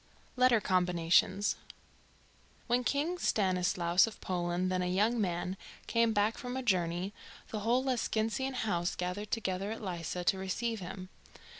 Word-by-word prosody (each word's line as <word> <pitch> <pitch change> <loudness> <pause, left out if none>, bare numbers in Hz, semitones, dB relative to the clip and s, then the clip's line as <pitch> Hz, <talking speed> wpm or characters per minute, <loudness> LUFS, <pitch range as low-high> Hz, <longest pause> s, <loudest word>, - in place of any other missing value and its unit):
LETTER 250 -2 +5
COMBINATIONS. 180 +1 +2 1.1
When 245 +1 +1
King 300 +8 0
Stanislaus 180 - +2
of 225 - -9
Poland, 180 0 -1
then 185 0 +1
a 180 - 0
young 215 +6 +2
man, 180 0 -2 0.3
came 230 -1 +2
back 210 +1 +1
from 250 +1 -4
a 260 - -3
journey, 180 -2 0 0.4
the 215 - -3
whole 235 +5 +2
Lescinskian 255 0 -1
House 180 -7 -1
gathered 180 +4 -3
together 195 -2 -2
at 225 - -5
Lissa 175 -1 -3
to 190 +2 +2
receive 220 +4 -2
him. 185 0 -7
195 Hz, 140 wpm, -32 LUFS, 180-230 Hz, 1.1 s, LETTER